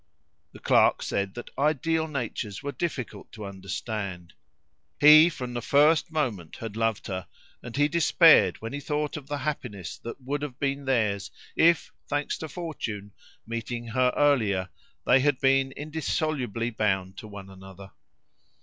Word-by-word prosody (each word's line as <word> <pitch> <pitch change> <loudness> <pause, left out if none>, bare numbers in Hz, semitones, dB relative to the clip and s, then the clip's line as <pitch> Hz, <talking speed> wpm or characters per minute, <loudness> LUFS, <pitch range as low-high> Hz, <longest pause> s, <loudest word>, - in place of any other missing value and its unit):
The - - -13
clerk - - +3
said 100 -1 -2
that 120 - -8
ideal 160 +2 +1
natures 120 -6 -4
were 145 - -3
difficult 145 -7 -5
to 105 -2 -8
understand. 100 -1 -5 0.7
He 155 +3 +9
from 125 -6 -6
the 120 - -3
first 150 +5 +3
moment 115 - -2
had 110 -2 -7
loved 115 -2 -1
her, 95 -2 -5 0.3
and 120 +1 -8
he 145 0 +4
despaired 165 +1 +5
when 115 - -5
he 145 - -3
thought 150 +1 -2
of 145 -3 -8
the 145 - -3
happiness 120 - -5
that 115 - -8
would 140 +2 -3
have 140 -4 -5
been 140 0 -1
theirs, 110 -6 0 0.3
if 170 -1 +3 0.2
thanks 145 0 -2
to 160 - -6
fortune, 120 - -5 0.3
meeting 115 +1 -5
her 125 +1 +2
earlier, 110 -11 +2 0.4
they 130 - +5
had 145 0 +2
been 135 0 +3
indissolubly 145 -6 -2
bound 95 -4 -1
to 110 - -9
one 100 -2 -10
another. 95 0 -12
125 Hz, 150 wpm, -27 LUFS, 105-145 Hz, 0.7 s, He